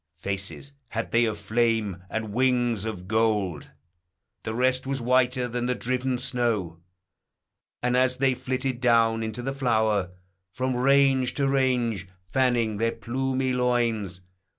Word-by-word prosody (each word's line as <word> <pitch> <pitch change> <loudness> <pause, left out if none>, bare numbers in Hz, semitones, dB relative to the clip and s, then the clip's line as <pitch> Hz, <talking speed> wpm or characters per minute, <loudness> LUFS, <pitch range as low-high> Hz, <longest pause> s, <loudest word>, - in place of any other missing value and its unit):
Faces 100 +9 -4
had 115 0 -4
they 115 +1 +4
of 110 -2 -2
flame, 110 -5 0
and 110 -2 -4
wings 120 -3 +1
of 95 -5 -5
gold: 105 -7 0 0.7
The 110 - -4
rest 130 +1 +1
was 135 0 -1
whiter 125 +1 +2
than 120 +1 -2
the 125 - 0
driven 125 +1 -1
snow; 115 -9 -1 1.0
And, 125 0 +1
as 130 0 +3
they 135 0 +2
flitted 130 0 -3
down 115 -2 +3
into 110 +2 -4
the 135 +2 -2
flower, 110 -7 +1 0.4
From 130 +4 -2
range 135 0 +3
to 140 -1 +1
range, 125 -7 +1 0.2
fanning 115 +1 +1
their 115 +2 0
plumy 130 +1 -2
loins. 115 -7 0
120 Hz, 135 wpm, -26 LUFS, 110-130 Hz, 1.0 s, they